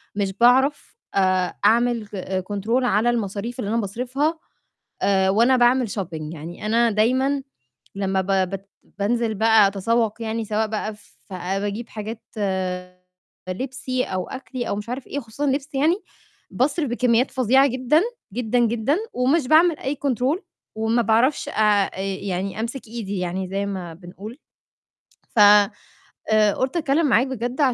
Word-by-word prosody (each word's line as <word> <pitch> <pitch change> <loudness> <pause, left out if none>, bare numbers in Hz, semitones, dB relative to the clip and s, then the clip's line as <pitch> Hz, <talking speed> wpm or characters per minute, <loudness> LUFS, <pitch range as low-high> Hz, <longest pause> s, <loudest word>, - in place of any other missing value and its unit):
مش 200 -2 -1
باعرف 260 - +3 0.2
آآ 185 -2 +2
أعمل 235 0 +3
ك 190 -1 -4
Control 225 +6 0
على 235 -1 +2
المصاريف 230 +1 -3
اللي 205 - -2
أنا 230 +2 +1
باصرِفها 255 - -2 0.6
آآ، 190 -1 +3
وأنا 235 +6 +4
باعمل 245 0 +3
Shopping 165 -8 -5
يعني 170 +6 -8
أنا 230 +2 +3
دايمًا 260 +6 +1 0.5
لمّا 195 -1 0
ب 190 - -8 0.2
بت 195 0 -7 0.3
بانزل 225 +1 0
بقى 220 -1 +5
أتسوق 220 +3 0
يعني 225 0 -2
سواء 215 +1 0
بقى 215 0 -3
ف 205 -1 -18
باجيب 200 +5 -3
حاجات 220 +1 -6 1.3
لِبسي 255 +4 -3
أو 185 -1 -3
أكلّي 260 -2 -5
أو - - 0
مش 210 +2 -6
عارف 255 +2 -5
إيه، 285 - -3
خصوصًا 245 +3 -5
لِبس 280 +1 -1
يعني، 305 +6 +3 0.6
باصرف 285 +2 0
بكميات 240 +1 +2
فظيعة 265 +2 +4
جدًا، 260 +4 +2 0.3
جدًا، 245 +1 0
جدًا، 235 +5 +1 0.2
ومش 260 +3 +1
باعمل 320 +2 +5
أي 275 +2 -3
Control 265 - +1 0.4
وما 225 +2 +1
باعرفش 230 +6 +2
آآ - - -7 0.4
أ - - -8
يعني 195 0 -3
أمسك 235 +3 -4
إيدي 215 -3 -5
يعني، 180 +1 -3
زي 195 +1 -2
ما 185 -4 -5
بنقول 190 +7 -10 0.9
ف - - -5
آآ، 210 +1 +3
قُلت 260 +5 -1
أتكلم 310 0 +2
معاك 250 0 +4
بجد 250 +1 -4
225 Hz, 145 wpm, -23 LUFS, 200-255 Hz, 1.3 s, بقى